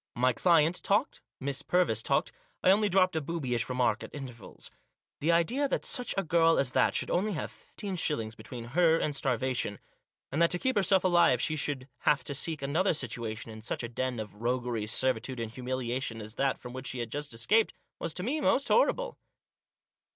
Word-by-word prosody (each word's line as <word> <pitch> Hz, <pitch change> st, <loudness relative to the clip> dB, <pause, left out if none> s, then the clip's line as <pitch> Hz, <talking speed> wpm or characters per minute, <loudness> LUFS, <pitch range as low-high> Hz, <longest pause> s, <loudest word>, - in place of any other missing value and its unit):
My 125 Hz, +1 st, +3 dB
client 165 Hz, +3 st, +3 dB
talked, 210 Hz, +8 st, 0 dB, 0.2 s
Miss 140 Hz, 0 st, -3 dB
Purvis 175 Hz, -, +2 dB
talked, -, -, +1 dB, 0.3 s
I 185 Hz, -, +6 dB
only 210 Hz, +1 st, +3 dB
dropped 185 Hz, -2 st, +3 dB
a 160 Hz, -, +1 dB
boobyish 130 Hz, -7 st, -2 dB
remark 125 Hz, -1 st, +1 dB
at -, -, -8 dB
intervals. 130 Hz, -5 st, -9 dB, 0.5 s
The 160 Hz, +4 st, +2 dB
idea 230 Hz, -, +2 dB
that -, -, -1 dB
such 250 Hz, -2 st, 0 dB
a 195 Hz, -, +2 dB
girl 165 Hz, 0 st, +4 dB
as 135 Hz, -2 st, +1 dB
that -, -, +2 dB
should -, -, -1 dB
only 205 Hz, +4 st, +1 dB
have 155 Hz, -, -4 dB
fifteen 200 Hz, -2 st, -7 dB
shillings 115 Hz, -10 st, -1 dB
between 120 Hz, 0 st, -8 dB
her 165 Hz, -1 st, +5 dB
and 150 Hz, -3 st, -1 dB
starvation, 130 Hz, -5 st, -1 dB, 0.5 s
and 150 Hz, +5 st, 0 dB
that 170 Hz, -, +5 dB
to 180 Hz, -, +1 dB
keep 260 Hz, +7 st, 0 dB
herself 190 Hz, -2 st, +3 dB
alive 175 Hz, -9 st, +4 dB
she 155 Hz, +4 st, 0 dB
should 140 Hz, -3 st, -3 dB
have 140 Hz, -4 st, +2 dB
to 140 Hz, -, -3 dB
seek 150 Hz, +1 st, -2 dB
another 165 Hz, +6 st, +1 dB
situation 115 Hz, -4 st, -4 dB
in 110 Hz, 0 st, -9 dB
such 115 Hz, -, -3 dB
a 120 Hz, -, -4 dB
den 125 Hz, 0 st, -2 dB
of 105 Hz, 0 st, -8 dB
roguery, 120 Hz, -2 st, -1 dB
servitude, 130 Hz, +2 st, 0 dB
humiliation, 125 Hz, 0 st, -3 dB
as 110 Hz, 0 st, -5 dB
that 135 Hz, +2 st, 0 dB
from 125 Hz, -, -10 dB
which 130 Hz, 0 st, -6 dB
she 130 Hz, -, -3 dB
had 120 Hz, -2 st, -4 dB
just 145 Hz, 0 st, -4 dB
escaped, 210 Hz, -, +3 dB, 0.3 s
was 165 Hz, -, -3 dB
to 180 Hz, -, -2 dB
me 290 Hz, +8 st, -1 dB
most 275 Hz, -1 st, +2 dB
horrible. -, -, +2 dB
140 Hz, 195 wpm, -30 LUFS, 120-175 Hz, 0.5 s, I